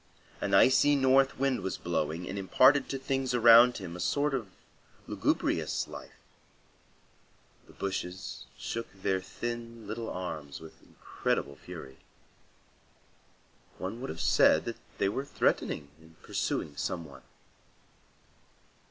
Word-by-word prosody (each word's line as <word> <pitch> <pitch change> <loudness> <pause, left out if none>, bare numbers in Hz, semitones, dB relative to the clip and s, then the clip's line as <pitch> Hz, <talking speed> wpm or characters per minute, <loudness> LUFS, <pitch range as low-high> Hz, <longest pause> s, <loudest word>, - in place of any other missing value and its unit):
An - - +1
icy 145 +3 +6
north 135 0 +4
wind 135 -1 +1
was 95 - -3
blowing, 85 0 -2
and 95 - -5
imparted 130 +9 +4
to 135 - -2
things 135 -1 -1
around 120 +1 +7
him 90 -4 -7
a - - -8
sort 145 +10 +1
of 115 -7 -2 0.6
lugubrious - - 0
life. - - -11 1.4
The - - -16
bushes 95 0 -5
shook 115 0 -4
their 95 0 0
thin 115 +2 -6
little 110 +2 -5
arms 80 -6 -5
with 80 0 -13
incredible 70 - -3
fury. 65 0 -10 1.8
One 105 +6 -5
would 135 - -5
have 80 - -6
said - - +4
that - - -4 0.2
they - - +2
were 120 +7 -2
threatening 75 - -1
and 80 0 -19
pursuing 75 - -2
some 85 +2 -3
one. 70 - -13
110 Hz, 125 wpm, -30 LUFS, 85-130 Hz, 1.8 s, around